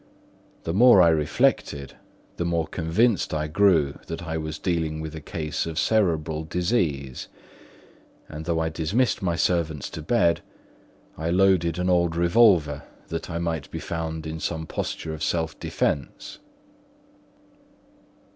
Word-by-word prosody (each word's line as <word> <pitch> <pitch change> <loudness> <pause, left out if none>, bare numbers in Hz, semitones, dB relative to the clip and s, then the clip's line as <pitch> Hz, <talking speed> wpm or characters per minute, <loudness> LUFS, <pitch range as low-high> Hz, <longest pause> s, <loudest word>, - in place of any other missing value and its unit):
The 80 - -2
more 120 +1 +7
I 85 -2 +7
reflected 75 -3 +1 0.4
the - - -1
more 85 -1 0
convinced 85 +6 +1
I 75 0 -1
grew 80 -4 +2
that 80 +1 -5
I 80 -1 -4
was 80 -1 -4
dealing 80 -3 -1
with 80 -1 -6
a 80 - -7
case 75 0 -3
of 80 -1 -5
cerebral 80 -6 +1
disease; 80 - -1 1.0
and 75 +1 -8
though 85 -1 0
I 80 0 0
dismissed 95 +10 0
my 85 -3 0
servants 80 -5 0
to - - -6
bed, 85 -1 +2 0.8
I 80 +1 -2
loaded 90 -2 +3
an 90 0 -1
old 85 -2 +2
revolver, 85 -5 +4 0.3
that 80 +1 -4
I 85 - -3
might 85 -3 -3
be - - -6
found 80 -1 -4
in 80 0 -5
some 80 0 -3
posture 80 0 -4
of 80 - -8
self 80 -1 -1
defence. 70 -3 -3
80 Hz, 140 wpm, -25 LUFS, 80-85 Hz, 1.0 s, more